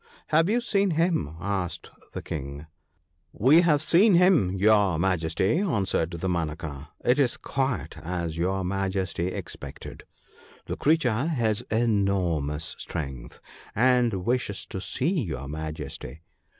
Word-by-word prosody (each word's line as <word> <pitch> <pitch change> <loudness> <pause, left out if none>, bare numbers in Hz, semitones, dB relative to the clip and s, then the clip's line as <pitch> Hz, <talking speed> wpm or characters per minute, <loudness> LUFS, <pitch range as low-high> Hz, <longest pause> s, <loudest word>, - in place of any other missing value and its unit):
' - - -30
Have 165 +4 +4
you 240 +3 +2
seen 200 -4 +1
him? 165 - +1
' - - -13
asked 95 -1 -3 0.2
the - - -5
King. 70 0 -6 0.7
'We 140 - +5
have 155 -4 +3
seen 185 +5 +5
him, 175 - +4
your 100 -3 +4
Majesty/ 90 - +1
answered 100 - 0
Dama 85 -1 -1
naka; 75 -3 -7
' - - -26
it 125 +4 +3
is 130 -4 +2
quite 135 -2 -2
as 85 -1 -3
your 95 +3 -1
Majesty 95 -2 -1
expected 95 - -7 0.3
— - - -25
the - - -4
creature 140 -4 +2
has 115 -8 0
enormous 95 -9 0
strength, 70 -6 -6 0.4
and 120 -5 +2
wishes 120 -5 -1
to 95 - -6
see 165 - 0
your 75 - -5
Majesty. 75 0 -6
95 Hz, 135 wpm, -26 LUFS, 80-130 Hz, 0.7 s, We